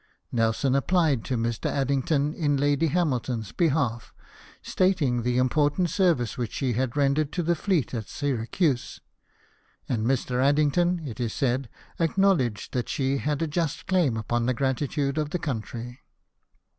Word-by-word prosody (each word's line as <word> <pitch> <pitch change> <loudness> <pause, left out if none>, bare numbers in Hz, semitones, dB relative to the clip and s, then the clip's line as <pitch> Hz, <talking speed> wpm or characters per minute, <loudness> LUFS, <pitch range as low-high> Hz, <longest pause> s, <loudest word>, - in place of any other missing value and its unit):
Nelson 115 +3 +1
applied 145 -3 +2
to 125 - -1
Mr. 115 -1 -1
Addington 140 +2 0
in 145 -4 0
Lady 145 +3 +2
Hamilton's 130 - -1
behalf, 140 -9 0 0.5
stating 160 -10 +1
the 125 +1 0
im 130 0 +3
portant 150 +5 +1
service 160 - +1
which 120 -3 -3
she 130 -3 -1
had 130 +3 -1
rendered 140 +1 +2
to 175 - -1
the 170 +2 +2
fleet 170 -5 0
at 115 -3 -4
Syracuse; 135 +1 -1 0.9
and 115 -3 -1
Mr. 130 -1 0
Addington, 155 +4 +2
it 120 -1 -7
is 120 -3 -2
said, 130 -1 0 0.3
acknowledged 165 - +1
that 125 -2 -2
she 135 -1 0
had 150 +2 -1
a - - 0
just 155 -1 -2
claim 175 -11 +2
upon 120 +2 -1
the 130 - +1
gratitude 140 +2 -1
of 150 -1 -1
the 180 - -1
country. 120 -4 -5
140 Hz, 150 wpm, -26 LUFS, 120-155 Hz, 0.9 s, im